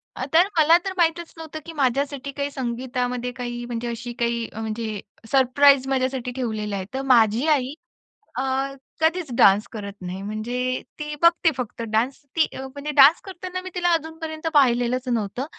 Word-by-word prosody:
आ - - -3
तर 345 +4 +6
मला 320 +2 +7
तर 385 - -2
माहीतच 340 0 +1
नव्हतं, 315 -1 -7
की 330 - -8
माझ्यासाठी 280 0 -1
काही 285 0 -2
संगीतामध्ये 250 -1 -3
काही 240 0 -4
म्हणजे 240 0 -4
अशी 240 +1 -5
काही, 235 -1 0
अ, 220 - -7
म्हणजे 220 -1 -4 0.3
सरप्राईज 270 0 +5
माझ्यासाठी 260 -2 -1
ठेवलेलं 220 -5 -3
आहे. 190 -1 -4
तर 265 - -2
माझी 225 +5 +3
आई 260 +1 -4 0.6
अ, 260 - 0 0.6
कधीच 325 +1 +2
डान्स 205 -3 +5
करत 200 -2 -6
नाही. 185 +1 -5
म्हणजे 240 +5 -2 0.2
ती 300 0 -4
बघते 335 -1 +5
फक्त 245 -2 -5
डान्स. 235 +5 +1 0.2
ती 320 - +4
अ, - - -5
म्हणजे 285 +3 -6
डान्स 285 +4 +7
करताना 370 -1 -6
मी 370 - -6
तिला 350 -1 +2
अजूनपर्यंत 320 0 -3
पाहिलेलंच 250 -2 +3
नव्हतं. 235 +1 -1
260 Hz, 165 wpm, -23 LUFS, 235-310 Hz, 0.6 s, मला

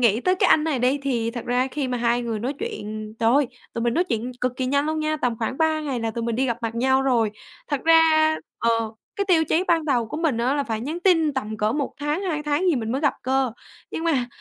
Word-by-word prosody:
nghĩ 230 -2 +3
tới 370 +7 +2
cái 370 - +2
anh 305 - +5
này 310 -5 0
đi, 255 +4 +2
thì 235 -5 0
thật 240 0 -6
ra 250 +1 +1
khi 275 0 -3
mà 250 -1 -2
hai 240 +1 +1
người 230 -2 -2
nói 245 +6 -2
chuyện, 215 - -5
trời 225 0 +3
ơi! 280 -3 +3 0.2
Tụi 230 - -3
mình 235 0 +1
nói 350 - +2
chuyện 245 -7 -3
cực 250 0 0
kỳ 260 - -1
nhanh 280 +3 +1
luôn 315 0 -1
nha, 310 0 0
tầm 245 -6 -1
khoảng 235 +3 -3
3 315 -1 +2
ngày 275 -5 -3
là 225 0 -1
tụi 230 +1 -4
mình 235 -1 -1
đi 265 - +1
gặp 235 -2 -1
mặt 230 0 -2
nhau 265 +2 +2
rồi. 240 -5 +2 0.4
Thật 285 -3 -1
ra, 320 -1 +5 0.2
ờ, 230 - +2 0.5
cái 400 - 0
tiêu 330 -3 +4
chí 330 +4 +1
ban 330 -2 +3
đầu 250 -6 +1
của 220 - -6
mình 310 -7 0
á, 250 +4 +1
là 285 -1 0
phải 220 -4 -3
nhắn 305 +8 -4
tin 330 -5 +3
tầm 220 -5 -3
cỡ 215 0 +1
1 285 0 -2
tháng, 295 +5 -1
2 320 -6 -2
tháng 295 +3 0
gì 330 - +3
mình 225 -2 -2
mới 265 - -1
gặp 290 -2 +2
cơ. 260 -1 +1 0.4
Nhưng 325 - -4
mà 280 -7 +1
265 Hz, 275 wpm, -23 LUFS, 235-310 Hz, 0.5 s, anh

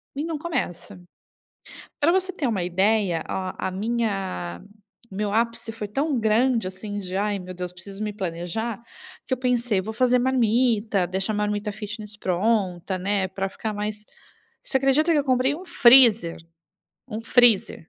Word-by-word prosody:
e 290 - -2
não 325 -2 -3
começo. 230 - -4 1.0
Para 300 +3 +4
você 375 +1 +1
ter 310 -7 -2
uma 200 -7 -1
ideia, 190 -1 +1
a 185 0 -3
a - - -3
minha 195 - -2 0.5
o 190 - -9
meu 205 0 -2
ápice 230 0 -1
foi 215 -2 -6
tão 275 +4 -1
grande, 225 0 +2
assim, 205 +2 -6
de: 185 -1 -5
"Ai 205 0 0
meu 185 0 -8
Deus, 180 0 -5
preciso 195 +3 -8
me 210 -1 -3
planejar." 195 +5 -4 0.5
Que 260 - 0
eu - - 0
pensei: 245 -5 +1
"Vou 220 +3 -6
fazer 250 +1 +3
marmita, 230 -6 +2
deixar 190 +4 -2
a - - -2
marmita 210 0 -1
fitness 210 0 -8
pronta, 190 -1 0
né, 195 0 0
para 195 +1 -3
ficar 215 +2 -5
mais" 210 0 -4 0.6
Você 265 - +1
acredita 275 +5 +3
que 315 - +3
eu - - 0
comprei 260 +1 +2
um 365 +3 -10
freezer? 235 - +6 0.7
Um 220 0 -5
freezer. 235 -3 +4
215 Hz, 165 wpm, -24 LUFS, 190-245 Hz, 1.0 s, freezer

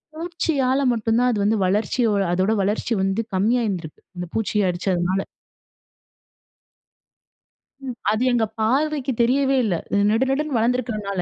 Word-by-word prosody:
பூச்சியால 300 -5 -1
மட்டுந்தான் 230 +2 +1
அது 215 - -1
வந்து 215 +2 +2
வளர்ச்சியோ 220 +5 +1 0.2
அதோட 185 +4 +1
வளர்ச்சி 210 +4 -1
வந்து 195 +3 0
கம்மியா 225 +6 +2
இருந்துருக்கு 175 -6 -5 0.2
அந்த 180 - -4
பூச்சிய 210 -2 0
அடிச்சதுனால. 180 +1 -1 2.6
ம், 255 -2 -5 0.2
அது 215 +2 -1
எங்க 235 -2 +2
பார்வைக்கு 275 +4 0
தெரியவே 270 +3 +2
இல்ல. 205 -6 0 0.4
நெடு 225 +4 +2
நெடுன்னு 280 -1 0
வளந்துருக்கிறதுனால 220 -5 -1
225 Hz, 120 wpm, -22 LUFS, 200-255 Hz, 2.6 s, வந்து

